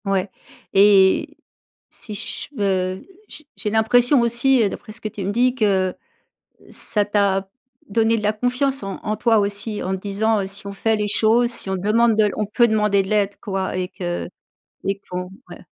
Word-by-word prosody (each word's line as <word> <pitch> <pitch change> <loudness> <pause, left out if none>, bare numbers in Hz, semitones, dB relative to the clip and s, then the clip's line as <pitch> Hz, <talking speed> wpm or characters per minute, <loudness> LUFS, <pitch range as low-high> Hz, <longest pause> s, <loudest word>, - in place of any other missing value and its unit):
Ouais 195 -1 -1 0.4
et 195 -1 +4 0.5
si 215 - -8
je - - -5
veux 190 -2 -1 0.2
j'ai 305 - -8
j'ai 210 - -3
l'impression 245 +5 +4
aussi, 235 +2 +3
heu, 205 - +2
d'après 215 - -9
ce 230 - -5
que - - -3
tu 200 -1 -7
me 195 - -1
dis, 245 +3 +2
que 195 -6 +1 0.8
ça 210 -2 -1
t'a 200 -2 0 0.4
donné 225 +2 +2
de 215 - -4
la 210 0 +1
confiance 250 +4 -1
en 195 -1 -5
en 215 0 -2
toi 225 -1 +3
aussi, 205 +1 -3
en 190 +1 -2
te - - -11
disant, 210 +2 0
heu: 195 - -3
«Si 200 +1 -4
on - - -6
fait 220 +3 0
les 210 0 -2
choses, 230 +3 +2
si 235 - -1
on 190 - -1
demande 220 +4 +2
de 215 -1 +3
on 215 - -1
peut 235 +3 +3
demander 210 -2 +2
de 190 - -8
l'aide, 205 -1 +1
quoi 190 -3 -3
et 180 0 -2
que 175 -2 -5 0.6
et 195 0 -1
qu'on», 180 0 -4 0.2
ouais. - - -11
210 Hz, 195 wpm, -21 LUFS, 195-225 Hz, 0.8 s, et